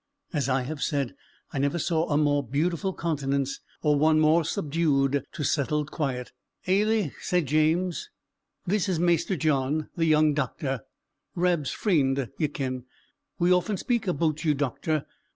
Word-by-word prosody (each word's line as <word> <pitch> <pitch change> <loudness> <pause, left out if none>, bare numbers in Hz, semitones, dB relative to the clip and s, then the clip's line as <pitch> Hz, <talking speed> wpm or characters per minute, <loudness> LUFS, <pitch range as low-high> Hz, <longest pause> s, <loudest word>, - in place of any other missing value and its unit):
As 145 -4 0
I 130 0 +1
have 145 +2 -5
said, 140 -5 -1 0.4
I 135 - -1
never 140 +4 +1
saw 165 -1 0
a 145 - +2
more 145 -1 +3
beautiful 160 - -1
countenance 140 -5 -1 0.2
or 150 -2 +3
one 155 +1 +4
more 155 +2 +4
subdued 145 -3 +1
to 160 - -4
settled 150 +1 0
quiet. 130 -5 -3 0.4
"Ailie," 205 -3 +2
said 180 -3 +1
James, 160 - +1 0.6
"this 195 +1 +1
is 180 - +1
Maister 175 +2 +2
John, 150 -1 0
the 165 - +1
young 155 -1 +4
doctor; 140 -3 -2 0.5
Rab's 175 -5 +1
freend, 135 - +1
ye 155 - +2
ken. 130 -3 -4 0.5
We 175 +1 +4
often 180 +3 +1
speak 235 0 -1
aboot 155 -2 0
you, 155 -3 +2
doctor." 145 +2 -1
155 Hz, 150 wpm, -27 LUFS, 140-170 Hz, 0.6 s, one